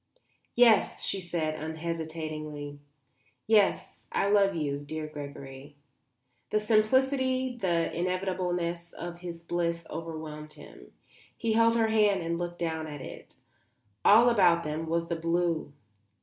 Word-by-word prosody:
"Yes," 235 -3 +4
she 195 - -1
said, 165 -3 -2
unhesitatingly. 155 -2 -5 0.7
"Yes, 210 -2 +2
I 200 - +1
love 200 -2 +4
you, 145 -3 -1
dear 155 +2 -5
Gregory." 140 -1 -9 0.7
The 215 - +2
simplicity, 260 +4 +2
the 175 -7 0
inevitableness 180 -1 -2
of 175 0 -7
his 170 -1 -8
bliss 170 -1 -1
overwhelmed 155 -2 -6
him. - - -14 0.5
He 230 -2 0
held 230 +1 +4
her 225 -1 +3
hand 210 -4 +3
and 170 +1 -2
looked 175 0 -4
down 160 -2 -2
at 145 -2 -7
it. - - -10 0.7
All 230 +4 +7
about 175 -6 +4
them 155 +2 -3
was 165 +1 0
the 170 - -1
blue. 165 -2 0
170 Hz, 125 wpm, -29 LUFS, 155-200 Hz, 0.7 s, All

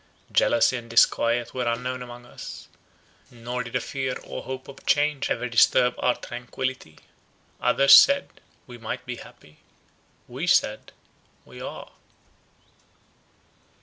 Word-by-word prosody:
Jealousy 120 +2 +3
and 115 -1 -10
disquiet 115 +1 +2
were 125 -2 -2
unknown 125 +2 -2
among 120 0 -10
us; - - -10 0.6
nor 120 +1 -5
did 115 +1 -8
a - - +3
fear 130 0 -4
or - - -7
hope 130 0 -7
of 140 - -13
change 145 -1 +1
ever 125 - -1
disturb 125 +1 +4
our 125 - +2
tranquillity. 125 -7 -6 0.6
Others 140 0 +7
said, 280 0 +3 0.2
We 120 -2 -12
might 120 +2 -6
be 125 0 -6
happy—we 75 -7 -12
said—We - - -3
are. - - -8
125 Hz, 115 wpm, -25 LUFS, 120-130 Hz, 0.6 s, Others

